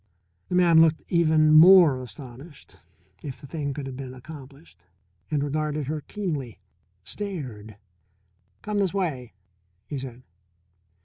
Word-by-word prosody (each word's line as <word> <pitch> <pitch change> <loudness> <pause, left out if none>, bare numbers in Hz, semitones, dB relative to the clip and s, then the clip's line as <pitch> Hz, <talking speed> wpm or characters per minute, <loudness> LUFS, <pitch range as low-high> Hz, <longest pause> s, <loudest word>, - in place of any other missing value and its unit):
The - - -1
man 170 -3 +6
looked 160 -1 +3
even 155 -3 +4
more 160 -4 +8
astonished, 130 +4 -12 0.4
if 135 -3 -7
the - - -12
thing 145 0 -4
could 140 0 -6
have 135 -1 -7
been 130 -1 -8
accomplished, 130 - -13 0.4
and 145 -2 0
regarded 150 0 -2
her 150 +2 -3
keenly 150 - -5 0.5
stared. 125 - -6 0.9
"Come 210 -1 -2
this 195 -1 0
way," 140 - -3 0.5
he 140 +4 -5
said. 130 -1 -9
145 Hz, 125 wpm, -25 LUFS, 130-165 Hz, 0.9 s, more